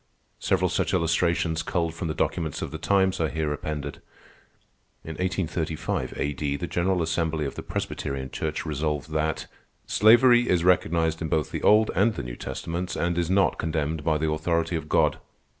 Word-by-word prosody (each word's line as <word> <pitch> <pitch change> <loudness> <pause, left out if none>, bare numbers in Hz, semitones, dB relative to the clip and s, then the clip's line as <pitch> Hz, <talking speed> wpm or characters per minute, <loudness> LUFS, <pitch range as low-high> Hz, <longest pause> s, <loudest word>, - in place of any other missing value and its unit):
Several 95 -1 +1
such 90 +2 0
illustrations, 85 -1 +1
culled 85 -1 -1
from 85 +1 -4
the 80 - -3
documents 80 -4 -1
of - - -5
the 80 - -6
times, 95 +1 +2
are 80 - +1
here 80 -2 -1
appended. 75 -1 -5 1.0
In 80 - -7
1835 85 -2 -2
A.D., 70 0 -1
the 85 - -3
General 90 +1 0
Assembly 80 -2 -1
of 70 - -4
the - - -6
Presbyterian 65 -1 -4
Church 80 0 -3
resolved 75 -1 -2
that: 80 0 -1 0.4
"_slavery 120 +3 +6
is 90 -2 +2
recognized 80 -2 +2
in 80 - -1
both 75 -2 0
the - - -3
Old 110 +1 +5
and 105 +4 +2
the - - -4
New - - -6
Testaments, 85 +7 -4
and 85 0 0
is 85 -1 0
not 95 +1 +2
condemned 80 -1 -2
by 75 0 +2
the 80 0 0
authority 85 +2 0
of 75 -2 -4
God. - - +2
80 Hz, 175 wpm, -26 LUFS, 75-90 Hz, 1.0 s, slavery